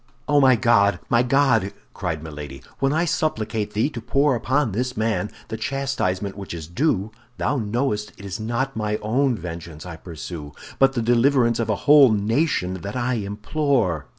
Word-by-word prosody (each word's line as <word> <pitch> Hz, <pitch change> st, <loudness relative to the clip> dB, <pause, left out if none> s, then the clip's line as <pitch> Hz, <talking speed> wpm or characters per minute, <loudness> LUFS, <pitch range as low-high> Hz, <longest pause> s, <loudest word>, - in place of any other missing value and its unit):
"Oh, 145 Hz, -1 st, +4 dB
my 130 Hz, -2 st, +6 dB
God, 100 Hz, -5 st, +3 dB
my 120 Hz, 0 st, +4 dB
God!" 125 Hz, -6 st, +2 dB, 0.2 s
cried 80 Hz, -3 st, -3 dB
Milady; 75 Hz, -4 st, -8 dB, 0.2 s
"when 135 Hz, 0 st, +2 dB
I 160 Hz, +3 st, +1 dB
supplicate 110 Hz, -10 st, -1 dB
thee 110 Hz, +5 st, +2 dB
to 120 Hz, -, -6 dB
pour 140 Hz, +4 st, +2 dB
upon 130 Hz, +1 st, 0 dB
this 125 Hz, +5 st, -2 dB
man 110 Hz, -3 st, 0 dB, 0.2 s
the 110 Hz, -, -4 dB
chastisement 110 Hz, -7 st, -2 dB
which 100 Hz, -3 st, -7 dB
is 80 Hz, -2 st, -6 dB
his 85 Hz, -, -17 dB
due, 110 Hz, -, +1 dB, 0.3 s
thou 145 Hz, -, 0 dB
knowest 105 Hz, -2 st, -1 dB
it 100 Hz, -, -11 dB
is 100 Hz, +1 st, -5 dB
not 120 Hz, +5 st, -2 dB
my 105 Hz, -1 st, -1 dB
own 125 Hz, +3 st, +1 dB
vengeance 85 Hz, -2 st, -8 dB
I 85 Hz, -3 st, -7 dB
pursue, 80 Hz, -3 st, -8 dB, 0.3 s
but 135 Hz, 0 st, +5 dB
the 120 Hz, -3 st, -1 dB
deliverance 120 Hz, 0 st, +3 dB
of 115 Hz, -2 st, -1 dB
a 110 Hz, -, +2 dB
whole 145 Hz, -4 st, +8 dB
nation 105 Hz, -, 0 dB
that 100 Hz, +6 st, -6 dB
I 125 Hz, 0 st, 0 dB
implore!" 105 Hz, -, -1 dB
110 Hz, 180 wpm, -23 LUFS, 95-135 Hz, 0.3 s, whole